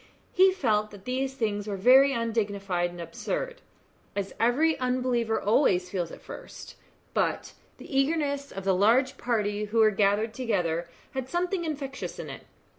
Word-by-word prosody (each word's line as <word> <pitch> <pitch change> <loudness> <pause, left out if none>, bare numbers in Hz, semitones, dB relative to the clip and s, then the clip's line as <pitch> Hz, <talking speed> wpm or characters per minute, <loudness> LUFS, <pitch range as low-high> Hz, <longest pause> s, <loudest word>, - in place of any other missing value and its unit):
he 380 +1 +6
felt 215 - +1
that 200 -2 -14
these 265 +1 -2
things 210 -4 -2
were 200 -2 -3
very 260 +7 +6
undignified 205 -7 -1
and 175 0 -11
absurd, 470 - -4 0.5
as 200 -1 -3
every 295 +8 +3
unbeliever 250 -3 0
always 195 -5 +2
feels 175 -4 -2
at - - -11
first; - - -10 0.4
but - - -1 0.2
the 270 - -9
eagerness 285 -1 0
of 195 - -6
the 195 0 +2
large 235 +8 +3
party 210 -3 0
who 215 +2 -3
were 220 -1 +6
gathered 205 +2 +1
together 175 -9 -1 0.2
had 265 -1 -4
something 350 +1 -1
infectious 280 -3 -5
in - - -6
it. - - -11
230 Hz, 155 wpm, -27 LUFS, 200-270 Hz, 0.5 s, he